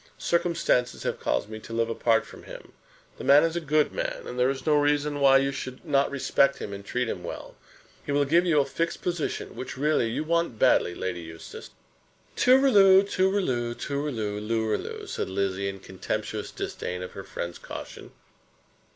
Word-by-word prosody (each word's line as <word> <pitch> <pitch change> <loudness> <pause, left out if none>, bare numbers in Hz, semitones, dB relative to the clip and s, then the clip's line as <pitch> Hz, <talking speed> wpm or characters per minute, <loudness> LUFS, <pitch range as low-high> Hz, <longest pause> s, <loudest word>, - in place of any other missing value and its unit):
Circumstances 170 -7 0
have - - -2
caused - - -1
me 110 0 -8
to 115 - -10
live 115 0 +1
apart 115 0 +1
from - - -13
him. - - -11 0.5
The - - -6
man 145 +2 +6
is 165 0 0
a 170 - -1
good 155 -1 +2
man, - - -3
and 125 - -6
there 125 +1 +4
is 135 -1 -4
no 155 -1 +3
reason 145 0 +1
why 135 -1 +6
you 135 0 +1
should 130 +2 -7
not 140 -3 +2
respect 140 0 +2
him, 100 - -6
and 100 0 -7
treat 125 +4 -2
him 90 -5 -4
well. 85 - -7 0.5
He - - -4
will 145 0 +2
give 170 +5 +4
you 165 -5 +3
a 140 - +3
fixed 170 +3 -3
position, 175 -3 -3
which 130 - -6
really 145 -4 +1
you 115 - -2
want 170 -6 0
badly, 110 -7 +3
Lady 90 -2 -4
Eustace." 80 0 -10 0.7
"Tooriloo, 210 -8 +6
tooriloo, 185 -13 0
tooriloo, 120 -9 -3
looriloo," 110 0 -2
said - - -4
Lizzie, 100 0 -1
in 95 0 -7
contemptuous 95 0 -4
disdain 90 0 -5
of 90 - -7
her - - -8
friend's 85 0 -6
caution. - - -9
135 Hz, 180 wpm, -26 LUFS, 110-155 Hz, 0.7 s, man